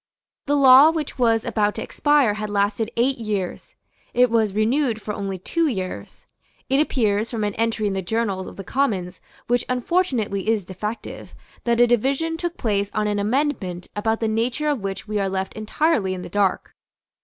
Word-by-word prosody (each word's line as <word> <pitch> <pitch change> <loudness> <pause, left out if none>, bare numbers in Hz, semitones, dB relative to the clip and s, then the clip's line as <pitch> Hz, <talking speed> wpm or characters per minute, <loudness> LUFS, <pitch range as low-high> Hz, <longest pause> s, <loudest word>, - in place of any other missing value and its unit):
The 290 - +2
law 275 +1 +8
which 315 -4 -4
was 230 -2 +2
about 210 -1 0
to - - -4
expire 290 -7 +2
had 210 0 -4
lasted 205 +2 0
eight 255 +2 +2
years. 205 -5 -4 0.4
It 250 -1 +4
was 220 -4 +1
renewed 230 +2 +1
for 210 -1 -5
only 195 -2 -4
two 330 - 0
years. 190 -9 -5 0.4
It 270 +1 +3
appears, 220 -7 +1
from 225 -3 -3
an 205 -1 -1
entry 225 0 -1
in 200 - 0
the 190 - -2
journals 195 -1 -2
of - - -10
the 195 - -7
Commons 195 -7 -1 0.2
which 245 +1 +1
unfortunately 250 - 0
is 215 -5 +1
defective, 210 +5 -6 0.3
that 235 0 +2
a 240 - +7
division 270 +7 +1
took 345 +1 -4
place 200 -3 0
on 215 -1 +1
an 205 -1 0
amendment 205 -6 -1
about 220 +2 -1
the 225 - +1
nature 240 +7 0
of 285 -6 -1
which 195 +1 -5
we 210 0 -1
are 195 -1 0
left 190 0 -3
entirely 215 - 0
in 180 - -7
the - - -8
dark. 200 0 0
220 Hz, 185 wpm, -22 LUFS, 200-255 Hz, 0.4 s, law